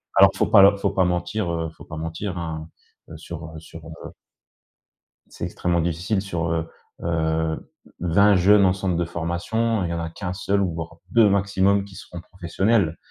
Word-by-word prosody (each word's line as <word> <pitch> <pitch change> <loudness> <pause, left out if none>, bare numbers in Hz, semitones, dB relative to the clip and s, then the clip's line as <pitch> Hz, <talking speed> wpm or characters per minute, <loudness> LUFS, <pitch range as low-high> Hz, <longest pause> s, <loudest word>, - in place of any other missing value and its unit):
alors - - +7
faut - - +1
pas 100 - +7
leur 100 +1 +6
faut - - 0
pas 95 - +2
mentir, 90 +2 -1
heu, 80 -1 -2
faut - - -12
pas 80 - -8
mentir, 80 +4 -4
hein, 80 -1 -5 0.5
sur, 80 - -8
heu 80 - -7
sur, 80 0 -12
heu 80 - -10 1.2
C'est - - -6
extrêmement 85 -1 -1
difficile 90 +5 -1
sur, 85 -4 -3
heu, 80 0 -2 0.3
heu, 80 -1 -1 0.3
20 100 +4 +4
jeunes 100 +3 +5
en 90 - +4
centre 95 -2 -2
de 85 - 0
formation. 85 +7 -1
Il 85 - -2
y 85 - -2
en 85 - -2
a 80 0 -4
qu'1 90 +2 -5
seul 100 +1 0
ou 90 -3 0
voire 80 +1 -7
2 115 -3 +5
maximum 100 0 +2
qui 100 -2 -13
seront 85 -1 -9
professionnels. 90 0 0
90 Hz, 190 wpm, -23 LUFS, 80-100 Hz, 1.2 s, alors